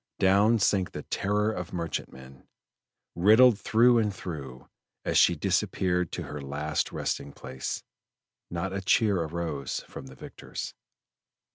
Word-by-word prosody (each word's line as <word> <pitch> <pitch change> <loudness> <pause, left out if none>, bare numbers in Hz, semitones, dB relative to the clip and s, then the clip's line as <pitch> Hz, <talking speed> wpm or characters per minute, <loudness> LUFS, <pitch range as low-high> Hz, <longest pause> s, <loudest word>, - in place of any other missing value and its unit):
Down 100 +4 +4
sank 100 -3 +1
the - - -6
terror 105 +2 0
of 90 -5 -5
merchantmen, 70 -6 -6 0.7
riddled 110 +5 +6
through 120 +3 +4
and 105 -2 +1
through, 70 -9 -7 0.4
and - - 0
as - - +2
she - - +5
disappeared 90 -2 0
to - - -3
her 75 -1 -7
last 75 +3 -2
resting 70 - -3
place, 65 -1 -6 0.7
not 90 +3 -3
a 100 - -2
cheer 100 -1 +3
arose 80 -4 -3
from 65 - -10
the 65 - -12
victors. - - -7
90 Hz, 135 wpm, -28 LUFS, 70-105 Hz, 0.7 s, riddled